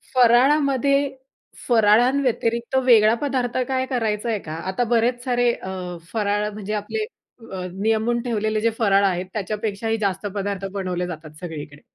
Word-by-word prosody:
फराळामध्ये, 275 +2 +4 0.5
फराळांव्यतिरिक्त 235 +1 +2
वेगळा 225 -3 +6
पदार्थ 260 -4 -1
काय 260 -1 0
करायचाय 225 -3 -1
का? 155 -3 -8 0.2
आता 245 +6 0
बरेच 245 +2 +1
सारे 245 -1 +2
अ, 185 -2 -6 0.2
फराळ, 210 -1 0
म्हणजे 210 0 -5
आपले 320 - -2 0.8
नियमून 225 +2 +1
ठेवलेले 215 -2 -1
जे 230 - +3
फराळ 200 -2 +4
आहेत, 180 -1 0
त्याच्यापेक्षाही 215 +1 -2
जास्त 200 -2 -2
पदार्थ 200 -1 -3
बनवले 180 -2 -2
जातात 155 -3 -8
सगळीकडे. 150 -4 -7
220 Hz, 125 wpm, -22 LUFS, 200-245 Hz, 0.8 s, वेगळा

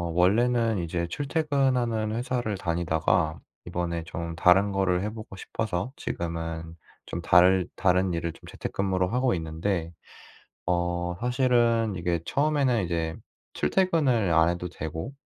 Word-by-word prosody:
원래는 115 +4 +3
이제 85 0 -2
출퇴근하는 135 - 0
회사를 120 -4 -2
다니다가 85 -1 0 0.3
이번에 85 -1 -3
좀 85 0 -5
다른 95 +4 +4
거를 95 -2 +1
해 105 - -2
보고 110 -3 -9
싶어서 110 +4 -3
지금은 80 -1 -4 0.3
좀 85 - -5
다를 90 +1 +5
다른 90 0 +2
일을 85 0 -2
좀 - - -19
재택근무를 95 -1 -1
하고 125 0 +2
있는데 80 +1 -2 0.7
어 85 0 0
사실은 120 -3 +2
이게 85 -1 -1
처음에는 140 -7 +2
이제 85 -2 -2 0.4
출퇴근을 145 - +2
안 80 +1 +5
해도 85 +1 -3
되고 80 - -6
90 Hz, 285 characters per minute, -27 LUFS, 85-120 Hz, 0.7 s, 다를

